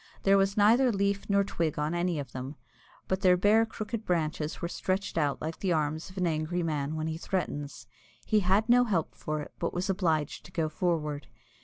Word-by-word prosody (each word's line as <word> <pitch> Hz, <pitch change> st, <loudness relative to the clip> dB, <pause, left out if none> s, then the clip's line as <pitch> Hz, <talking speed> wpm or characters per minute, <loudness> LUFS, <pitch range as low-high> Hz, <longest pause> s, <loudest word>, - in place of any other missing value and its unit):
There 195 Hz, 0 st, +5 dB
was 195 Hz, +1 st, +2 dB
neither 235 Hz, +5 st, +5 dB
leaf 200 Hz, -1 st, -1 dB
nor 200 Hz, 0 st, +4 dB
twig 165 Hz, -5 st, -2 dB
on 150 Hz, +2 st, -1 dB
any 175 Hz, -1 st, 0 dB
of 140 Hz, -4 st, -5 dB
them, 130 Hz, +3 st, -6 dB, 0.5 s
but 190 Hz, 0 st, -1 dB
their 180 Hz, -2 st, +5 dB
bare 215 Hz, +4 st, +4 dB
crooked 220 Hz, 0 st, -5 dB
branches 155 Hz, -4 st, -1 dB
were 170 Hz, -, -2 dB
stretched 190 Hz, +2 st, -2 dB
out 145 Hz, -4 st, +1 dB
like 160 Hz, +1 st, -4 dB
the 185 Hz, -3 st, +1 dB
arms 155 Hz, +1 st, -1 dB
of 185 Hz, -, -15 dB
an 180 Hz, -, +1 dB
angry 165 Hz, +2 st, -1 dB
man 150 Hz, -2 st, -2 dB
when 155 Hz, 0 st, -2 dB
he 160 Hz, 0 st, -3 dB
threatens. 145 Hz, -8 st, -3 dB, 0.4 s
He 215 Hz, -, +3 dB
had 200 Hz, +3 st, +2 dB
no 245 Hz, +1 st, +5 dB
help 185 Hz, -9 st, -1 dB
for 155 Hz, 0 st, -4 dB
it, -, -, -9 dB
but 170 Hz, -, -2 dB
was 185 Hz, +3 st, 0 dB
obliged 160 Hz, -6 st, 0 dB
to 180 Hz, -, -13 dB
go 165 Hz, -3 st, -1 dB
forward. 150 Hz, -4 st, -1 dB
175 Hz, 205 wpm, -29 LUFS, 155-195 Hz, 0.5 s, There